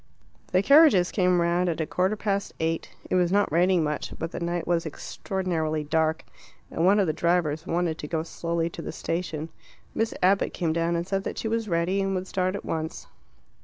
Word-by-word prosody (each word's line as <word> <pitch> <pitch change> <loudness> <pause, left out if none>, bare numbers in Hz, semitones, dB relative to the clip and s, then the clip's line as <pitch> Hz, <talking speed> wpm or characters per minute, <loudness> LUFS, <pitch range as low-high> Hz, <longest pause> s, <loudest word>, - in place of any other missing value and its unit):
The 185 +1 +3
carriages 280 - +6
came 180 -2 +2
round 175 +1 +2
at 165 - -2
a 160 - 0
quarter 185 +6 0
past 200 -2 -2
eight. 165 0 -1 0.2
It - - -4
was 180 -1 +3
not 205 -3 +2
raining 175 +1 +3
much, 150 -1 -3
but 165 +1 -4
the - - -5
night 170 0 -2
was 170 -1 +1
extraordinarily 160 -1 -3
dark, 160 +1 0 0.5
and 165 - -1
one 200 +4 +5
of 200 - +3
the 155 - 0
drivers 165 -2 0
wanted 170 -2 -1
to 150 - -5
go 160 0 -1
slowly 170 0 -2
to - - -7
the - - -5
station. 165 -1 -3 0.4
Miss 225 0 -1
Abbott 195 +2 +3
came 165 -3 0
down 170 +1 0
and 170 0 -1
said 195 0 -1
that - - -4
she - - -2
was 225 -1 -1
ready, 175 +3 +1
and 195 0 -1
would 185 0 -2
start 185 0 -1
at 200 - -6
once. 160 0 -4
175 Hz, 205 wpm, -26 LUFS, 165-190 Hz, 0.5 s, carriages